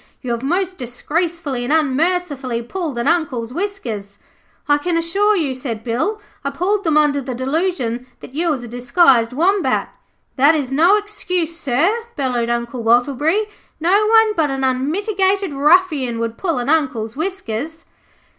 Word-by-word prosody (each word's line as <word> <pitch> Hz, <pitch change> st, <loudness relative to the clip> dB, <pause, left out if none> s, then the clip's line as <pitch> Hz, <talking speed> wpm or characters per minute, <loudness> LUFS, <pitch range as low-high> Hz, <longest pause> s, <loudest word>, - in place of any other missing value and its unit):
You 250 Hz, -, -3 dB
have 235 Hz, 0 st, -2 dB
most 365 Hz, +6 st, -1 dB
disgracefully 295 Hz, +2 st, -2 dB
and 245 Hz, -, -2 dB
unmercifully 295 Hz, -4 st, 0 dB
pulled 310 Hz, 0 st, -4 dB
an 235 Hz, -, -1 dB
Uncle's 275 Hz, -8 st, 0 dB
whiskers.' 240 Hz, -, -4 dB, 0.5 s
'I 290 Hz, 0 st, +4 dB
can 340 Hz, +2 st, -1 dB
assure 395 Hz, +6 st, +2 dB
you,' 305 Hz, -8 st, 0 dB
said 240 Hz, -4 st, -5 dB
Bill, 260 Hz, -, -1 dB, 0.2 s
'I 280 Hz, -, -1 dB
pulled 375 Hz, +8 st, -1 dB
them 315 Hz, -2 st, +3 dB
under 290 Hz, -2 st, +3 dB
the 255 Hz, -1 st, -5 dB
delusion 260 Hz, -3 st, -1 dB
that -, -, -12 dB
you 335 Hz, +4 st, 0 dB
was 270 Hz, -6 st, -1 dB
a -, -, -7 dB
disguised 245 Hz, 0 st, +3 dB
Wombat.' 365 Hz, +9 st, +1 dB, 0.5 s
'That 285 Hz, +5 st, +5 dB
is 270 Hz, -4 st, -2 dB
no 345 Hz, +9 st, +5 dB
excuse, 365 Hz, -5 st, -2 dB
sir,' 335 Hz, -, 0 dB
bellowed 250 Hz, -4 st, -1 dB
Uncle 235 Hz, +1 st, -2 dB
Wattleberry. 280 Hz, -, +2 dB, 0.3 s
'No 390 Hz, +6 st, +3 dB
one 445 Hz, -1 st, +5 dB
but 315 Hz, -3 st, +1 dB
an 270 Hz, 0 st, -2 dB
unmitigated 380 Hz, +8 st, 0 dB
ruffian 295 Hz, -4 st, +3 dB
would 230 Hz, 0 st, -3 dB
pull 335 Hz, -1 st, -2 dB
an 245 Hz, 0 st, -2 dB
Uncle's 260 Hz, -8 st, 0 dB
whiskers. 320 Hz, -, -4 dB
295 Hz, 155 wpm, -19 LUFS, 250-360 Hz, 0.5 s, That